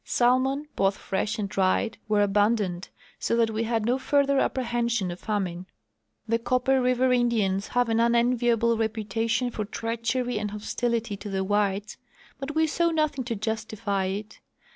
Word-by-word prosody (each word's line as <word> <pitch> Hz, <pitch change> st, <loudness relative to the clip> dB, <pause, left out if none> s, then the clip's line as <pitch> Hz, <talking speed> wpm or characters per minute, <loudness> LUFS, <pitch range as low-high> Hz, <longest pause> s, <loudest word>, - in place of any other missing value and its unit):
Salmon, 260 Hz, +4 st, +2 dB
both 195 Hz, 0 st, +1 dB
fresh 205 Hz, +2 st, -2 dB
and 210 Hz, -2 st, -2 dB
dried, 195 Hz, +3 st, 0 dB
were 210 Hz, -1 st, +3 dB
abundant, 205 Hz, -3 st, +1 dB, 0.3 s
so -, -, 0 dB
that 230 Hz, -1 st, +2 dB
we 220 Hz, +1 st, -1 dB
had 225 Hz, -1 st, 0 dB
no 250 Hz, +3 st, +1 dB
further 280 Hz, 0 st, +2 dB
apprehension 235 Hz, -6 st, 0 dB
of 175 Hz, -, -7 dB
famine. 185 Hz, -4 st, -3 dB, 0.6 s
The 230 Hz, +1 st, +1 dB
Copper 255 Hz, +2 st, +2 dB
river 255 Hz, 0 st, +2 dB
Indians 215 Hz, -6 st, +1 dB
have 245 Hz, -1 st, +1 dB
an 225 Hz, 0 st, +1 dB
unenviable 235 Hz, -1 st, +2 dB
repu 220 Hz, -1 st, -1 dB
tation 225 Hz, +3 st, 0 dB
for 215 Hz, -, -2 dB
treachery 230 Hz, +2 st, -2 dB
and 210 Hz, 0 st, -2 dB
hostilit}^ 220 Hz, 0 st, -2 dB
to 205 Hz, -, -7 dB
the 190 Hz, -1 st, -1 dB
whites; 205 Hz, +1 st, 0 dB, 0.4 s
but 280 Hz, +2 st, -5 dB
we 320 Hz, 0 st, +4 dB
saw 335 Hz, +2 st, +1 dB
nothing 305 Hz, -4 st, 0 dB
to 235 Hz, -1 st, -2 dB
justify 215 Hz, -2 st, -2 dB
it. 205 Hz, +3 st, -5 dB
225 Hz, 160 wpm, -26 LUFS, 205-245 Hz, 0.6 s, we